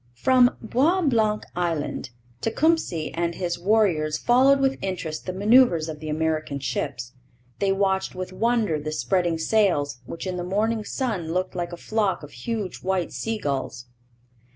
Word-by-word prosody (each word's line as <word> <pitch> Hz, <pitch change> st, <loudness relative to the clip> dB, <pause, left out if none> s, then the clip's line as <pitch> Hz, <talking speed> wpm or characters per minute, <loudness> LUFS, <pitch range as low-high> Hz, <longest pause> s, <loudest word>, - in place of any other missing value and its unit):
From 250 Hz, -, +4 dB
Bois 290 Hz, -, +2 dB
Blanc 220 Hz, -7 st, +2 dB
Island 165 Hz, -7 st, -2 dB, 0.3 s
Tecumseh 225 Hz, -, +1 dB
and 170 Hz, 0 st, -1 dB
his 175 Hz, -2 st, -3 dB
warriors 175 Hz, -6 st, +2 dB
followed 265 Hz, -, +4 dB
with 270 Hz, 0 st, +1 dB
interest 180 Hz, -5 st, -4 dB
the -, -, -1 dB
manoeuvres 200 Hz, -4 st, +4 dB
of 155 Hz, -2 st, -6 dB
the 155 Hz, 0 st, -6 dB
American 155 Hz, -2 st, -1 dB
ships. 125 Hz, -2 st, -3 dB, 0.5 s
They 200 Hz, -1 st, +2 dB
watched 195 Hz, -1 st, 0 dB
with 185 Hz, 0 st, -5 dB
wonder 225 Hz, -6 st, +1 dB
the 155 Hz, +1 st, -4 dB
spreading 170 Hz, +6 st, 0 dB
sails, 160 Hz, -, +1 dB
which 165 Hz, -, -6 dB
in 185 Hz, -1 st, -3 dB
the 175 Hz, -, -3 dB
morning 215 Hz, +4 st, 0 dB
sun 205 Hz, -, -3 dB
looked 185 Hz, +1 st, -1 dB
like 175 Hz, -1 st, -3 dB
a 175 Hz, -, -6 dB
flock 210 Hz, -3 st, -1 dB
of 145 Hz, -, -10 dB
huge 200 Hz, -, -4 dB
white 185 Hz, -2 st, -1 dB
sea 225 Hz, 0 st, -2 dB
gulls. 135 Hz, -, -3 dB
185 Hz, 155 wpm, -24 LUFS, 160-220 Hz, 0.5 s, From